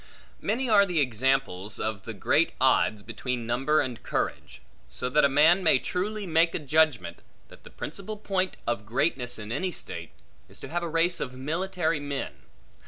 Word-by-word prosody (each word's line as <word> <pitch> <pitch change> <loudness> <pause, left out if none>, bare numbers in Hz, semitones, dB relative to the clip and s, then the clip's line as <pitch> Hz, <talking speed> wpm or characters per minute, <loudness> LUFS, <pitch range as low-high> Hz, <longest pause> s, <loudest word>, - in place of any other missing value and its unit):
Many 255 +4 -1
are 210 -3 +6
the 175 -3 0
examples 125 -6 0
of 110 -3 -3
the - - -6
great - - +2
odds, 105 -2 +3
between 120 +2 -4
number 135 +6 +2
and 120 -2 -5
courage; - - -3 0.3
so 125 - -4
that 150 +3 +3
a 140 - +5
man 155 +7 +5
may 160 -6 +5
truly 205 +8 -3
make 165 -1 +2
a 150 - -4
judgment, 145 - +2 0.3
that - - -16
the - - -12
principal 200 +6 -6
point 190 -3 -1
of 120 -3 -1
greatness 125 +2 -1
in 105 0 -7
any 185 +10 -1
state, 85 - -6 0.4
is - - -12
to - - -8
have 175 +2 -1
a 170 - -3
race 170 +2 +2
of 125 - -4
military 160 +4 -1
men. 140 - -4
145 Hz, 175 wpm, -27 LUFS, 120-175 Hz, 0.4 s, are